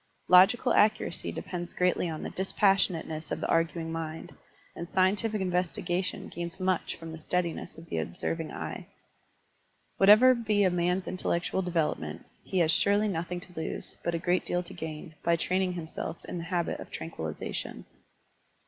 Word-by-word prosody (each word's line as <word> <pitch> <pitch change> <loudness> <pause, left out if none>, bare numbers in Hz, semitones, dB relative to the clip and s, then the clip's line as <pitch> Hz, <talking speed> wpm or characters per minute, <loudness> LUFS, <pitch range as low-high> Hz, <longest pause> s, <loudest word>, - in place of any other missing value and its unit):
LfOgical 210 +7 +6
accuracy 215 -4 +2
depends 175 -1 -5
greatly 180 -1 +2
on 155 -1 -5
the - - -4
dispas 190 +1 -4 0.3
sionateness 160 -2 -6
of - - -1
the - - -2
arguing 165 0 +1
mind, 160 -1 -5 0.4
and 170 +1 -6
scientific 205 +3 +2
investigation 180 0 -1
gains 170 +2 -6
much 185 -1 0
from 165 -1 -9
the 160 - -8
steadiness 170 0 -2
of 165 - -11
the 80 - -2
observing 155 - -3
eye. - - -6 1.1
Whatever 215 +6 +8
be 215 -4 +1
a 185 - +4
man's 180 +1 +1
intel 185 - -6
lectual 190 +2 -2
development, 160 - -1 0.2
he 190 - -3
has 165 -3 +4
surely 205 +5 +3
nothing 175 0 -3
to 180 - -15
lose, 160 - -3
but 170 - 0
a - - +1
great 175 +2 +1
deal 180 0 -1
to 175 - -8
gain, 160 +1 -7
by 170 - +3
training 185 +2 0
him 170 -2 -5
self 160 +1 -6
in 175 - -5
the 165 - -5
habit 175 -1 -1
of - - -9
tranquillization. 80 - -5
175 Hz, 165 wpm, -29 LUFS, 165-185 Hz, 1.1 s, Whatever